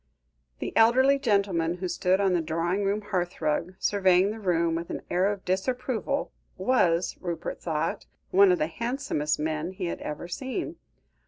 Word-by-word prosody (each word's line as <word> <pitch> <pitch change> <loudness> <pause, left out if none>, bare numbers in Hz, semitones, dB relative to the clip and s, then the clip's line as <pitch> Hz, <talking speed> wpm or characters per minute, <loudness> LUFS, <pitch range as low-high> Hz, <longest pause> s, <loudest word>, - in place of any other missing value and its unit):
The - - -5
elderly 260 +5 +5
gentleman 195 -8 +1
who 185 +1 -4
stood 180 +2 +1
on 195 -2 +2
the 175 - +2
drawing 165 +5 -1
room 200 +2 0
hearthrug, 175 -1 -1
surveying 190 -1 +3
the 220 - -7
room 170 -4 +1
with 170 +1 -3
an - - -5
air 185 +3 +2
of 200 -2 -7
disapproval, 250 +7 -1 0.3
was, 185 -5 +2
Rupert 170 -3 -4
thought, 160 -1 -2 0.2
one 195 0 +6
of 180 - +3
the 155 - +1
handsomest 230 - -2
men 155 +3 -2
he 185 - -4
had 170 - -4
ever 150 +3 -5
seen. 270 - -4
185 Hz, 160 wpm, -27 LUFS, 170-210 Hz, 0.3 s, one